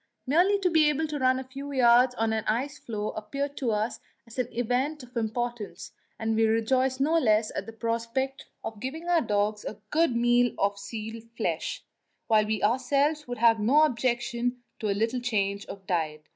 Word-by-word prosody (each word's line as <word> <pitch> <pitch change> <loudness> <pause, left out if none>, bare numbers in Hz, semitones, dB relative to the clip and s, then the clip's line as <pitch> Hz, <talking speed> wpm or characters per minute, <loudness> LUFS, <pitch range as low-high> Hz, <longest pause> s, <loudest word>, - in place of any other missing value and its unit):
Merely 350 +9 +4
to 365 - +3
be 315 -2 +5
able 300 +2 0
to 295 -1 -3
run 260 0 +3
a 260 - -4
few 275 +2 -8
yards 250 -1 +5
on 225 -1 0
an 220 -1 -1
ice 260 +7 -1
floe 215 -2 -4
appeared 275 +7 -4
to 255 - -1
us 215 +1 -1 0.4
an 250 -2 -1
event 250 +5 -1
of 250 +1 -15
importance, 225 -4 -3 0.3
and 225 0 -1
we 225 0 +4
rejoiced 255 +4 +1
no 315 +4 +3
less 215 -5 +2
at - - -4
the - - -6
prospect 230 +4 -2 0.2
of 220 -2 -6
giving 315 +9 -5
our 345 -2 +4
dogs 210 -2 0
a - - -6
good 320 -5 +2
meal 240 0 +3
of 200 0 0
seal's 225 +1 -7
flesh, - - -2 0.4
while 215 -2 +3
we 215 -2 -1
ourselves 275 +6 +1
would 245 0 -4
have 225 0 +4
no 265 +9 +5
objection 245 -2 0 0.2
to 215 - -2
a 200 - 0
little 225 +4 0
change 200 -4 -1
of 195 -1 -9
diet. 155 -4 -1
240 Hz, 185 wpm, -27 LUFS, 220-270 Hz, 0.4 s, be